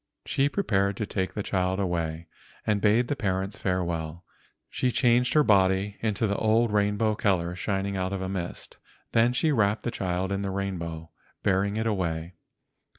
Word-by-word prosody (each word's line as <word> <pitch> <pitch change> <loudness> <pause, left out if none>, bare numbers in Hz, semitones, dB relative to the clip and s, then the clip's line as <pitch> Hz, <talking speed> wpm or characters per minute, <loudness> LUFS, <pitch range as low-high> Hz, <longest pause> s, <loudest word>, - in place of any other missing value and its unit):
She 140 +1 +1
prepared 100 - 0
to 105 - -1
take 95 -2 -3
the 105 - -2
child 95 0 0
away, 85 -3 -2 0.4
and 105 -2 +1
bade 110 +4 +3
the 145 - -1
parents 95 -4 -2
farewell. 85 -3 -2 0.4
She 125 - -1
changed 125 0 +3
her 150 - +6
body 100 -2 +3
into 110 0 0
the 100 -1 0
old 110 0 +2
rainbow 105 +1 +2
colors 90 -4 0
shining 100 -1 -1
out 95 0 -1
of 100 - -2
a - - -2
mist, 90 -2 -5 0.3
then 115 +1 +4
she 155 +5 +1
wrapped 105 -5 +2
the 120 - -1
child 95 -2 -2
in 100 0 -1
the 100 - -2
rainbow, 85 -4 -4 0.3
bearing 100 +1 +1
it 110 - -1
away. 85 -5 -1
100 Hz, 170 wpm, -27 LUFS, 95-110 Hz, 0.4 s, her